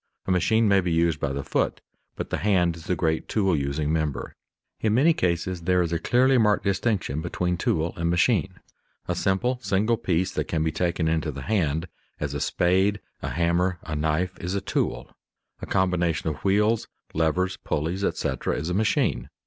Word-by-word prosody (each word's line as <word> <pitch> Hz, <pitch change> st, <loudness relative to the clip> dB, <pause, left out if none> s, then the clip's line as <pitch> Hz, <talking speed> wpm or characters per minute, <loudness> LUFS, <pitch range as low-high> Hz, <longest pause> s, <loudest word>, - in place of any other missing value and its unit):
A -, -, -1 dB
machine 105 Hz, +6 st, +3 dB
may 100 Hz, -1 st, +4 dB
be 90 Hz, -1 st, -2 dB
used 80 Hz, -1 st, +2 dB
by 70 Hz, -, -1 dB
the 70 Hz, 0 st, -3 dB
foot, -, -, -1 dB, 0.4 s
but -, -, -5 dB
the -, -, -1 dB
hand 90 Hz, -5 st, +2 dB
is 85 Hz, -1 st, -12 dB
the 90 Hz, -, 0 dB
great 80 Hz, -1 st, 0 dB
tool 95 Hz, -5 st, +2 dB
using 75 Hz, +2 st, -1 dB
member. 75 Hz, -5 st, -2 dB, 0.5 s
In 110 Hz, -1 st, +1 dB
many 155 Hz, +7 st, +5 dB
cases 90 Hz, -, -1 dB
there 90 Hz, +1 st, +2 dB
is 85 Hz, 0 st, -2 dB
a 85 Hz, -, 0 dB
clearly 130 Hz, +5 st, +3 dB
marked 105 Hz, -2 st, +3 dB
distinction 100 Hz, -, 0 dB
between 90 Hz, +1 st, -1 dB
tool 85 Hz, -1 st, 0 dB
and 85 Hz, 0 st, -1 dB
machine. 95 Hz, +1 st, +2 dB, 0.5 s
A 90 Hz, -, 0 dB
simple, 100 Hz, +8 st, 0 dB
single 105 Hz, +3 st, +1 dB
piece 90 Hz, -2 st, 0 dB
that -, -, -2 dB
can 80 Hz, -2 st, 0 dB
be 80 Hz, -, 0 dB
taken 85 Hz, 0 st, 0 dB
into 80 Hz, -1 st, 0 dB
the 70 Hz, -1 st, -7 dB
hand, 85 Hz, -4 st, 0 dB, 0.3 s
as 70 Hz, -1 st, -3 dB
a 70 Hz, -, -3 dB
spade, 95 Hz, +4 st, +2 dB, 0.2 s
a -, -, -3 dB
hammer, 85 Hz, +2 st, +1 dB
a 75 Hz, -, -4 dB
knife, 80 Hz, +5 st, 0 dB
is 90 Hz, +3 st, -3 dB
a -, -, +1 dB
tool; -, -, -2 dB, 0.5 s
a -, -, -6 dB
combination 85 Hz, -4 st, +1 dB
of 75 Hz, -, -7 dB
wheels, 105 Hz, +3 st, +2 dB, 0.3 s
levers, 90 Hz, +4 st, +1 dB
pulleys, 85 Hz, +6 st, -2 dB
etc., -, -, -1 dB
is 80 Hz, +4 st, -3 dB
a -, -, 0 dB
machine. 105 Hz, +3 st, +1 dB
90 Hz, 190 wpm, -25 LUFS, 80-95 Hz, 0.5 s, many